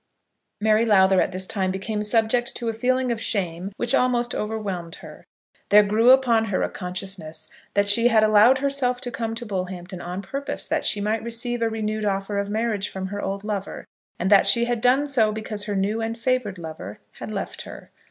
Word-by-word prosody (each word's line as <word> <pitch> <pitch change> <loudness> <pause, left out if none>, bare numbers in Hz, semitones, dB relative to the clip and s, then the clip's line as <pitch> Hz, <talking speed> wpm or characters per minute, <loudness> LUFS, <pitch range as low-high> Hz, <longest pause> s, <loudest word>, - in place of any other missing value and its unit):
Mary 215 +1 +3
Lowther 190 -4 +4
at - - 0
this 185 +1 -3
time 190 -1 -1
became 195 +3 -3
subject 225 +3 +1
to 235 - -3
a - - -2
feeling 255 +2 0
of 230 -1 -3
shame 185 -4 -2
which 240 - -1
almost 245 -1 +1
overwhelmed 200 -6 -4
her. - - -13 0.4
There 210 +1 +7
grew 215 +4 +3
upon 245 -4 +5
her 195 -3 -1
a - - -2
consciousness 180 -4 -6 0.3
that 200 0 +3
she 230 +4 +5
had 225 -3 +4
allowed 215 +4 +6
herself 265 -2 0
to 245 - -5
come 225 -1 -3
to 240 +1 -6
Bullhampton 185 -3 -5
on 180 +3 -5
purpose 275 +7 -5
that - - -1
she 205 - +1
might 215 +2 0
receive 235 +1 -4
a 230 - +2
renewed 215 -1 -3
offer 200 0 -1
of 200 0 -3
marriage 215 -2 -1
from 190 0 -5
her 205 +1 -4
old 195 +1 -4
lover, 205 -2 -4 0.3
and 185 +3 -1
that 200 - +6
she 235 0 +4
had 240 -1 -2
done 260 +4 +3
so 240 -7 +2
because 215 -1 -5
her 205 -1 -3
new 205 +4 0
and 225 +1 -3
favoured 230 -5 -1
lover 155 - -8 0.2
had - - -6
left - - -5
her. - - -11
215 Hz, 200 wpm, -23 LUFS, 195-235 Hz, 0.4 s, There